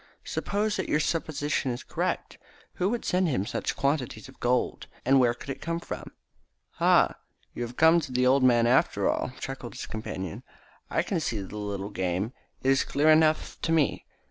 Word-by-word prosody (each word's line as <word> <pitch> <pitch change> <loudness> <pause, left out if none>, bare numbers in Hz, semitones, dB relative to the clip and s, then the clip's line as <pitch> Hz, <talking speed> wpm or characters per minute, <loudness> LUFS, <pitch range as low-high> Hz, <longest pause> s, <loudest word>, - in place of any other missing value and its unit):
"Supposing 205 -1 -1
that - - -9
your 150 - +3
supposition 150 -4 -1
is 120 0 -4
correct, - - -3 0.3
who 185 - 0
would 235 +1 -2
send 180 0 +2
him 125 - 0
such - - -2
quantities 140 -6 -1
of 135 - -16
gold, 125 +1 0 0.2
and 135 +1 +5
where 120 -2 +3
could 135 - -7
it - - -7
come 165 +1 -2
from?" - - -7 0.7
"Ha, - - +5 0.4
you - - -6
have 120 -1 -3
to - - -30
come 160 +2 +6
to 145 -5 -6
the 125 0 +2
old 135 +2 +5
man 120 -2 +5
after 125 +3 +3
all!" - - 0
chuckled 135 -3 -6
his - - -5
companion. 95 -5 -5 0.5
"I - - +1
can 180 - -1
see 115 -8 -2
the 100 +2 -7
little 100 -1 -4
game. 95 +4 -1 0.3
It 135 - +4
is 135 - +3
clear 150 +2 +3
enough 155 0 +3
to 165 - -1
me. 160 -4 +1
135 Hz, 195 wpm, -27 LUFS, 120-155 Hz, 0.7 s, come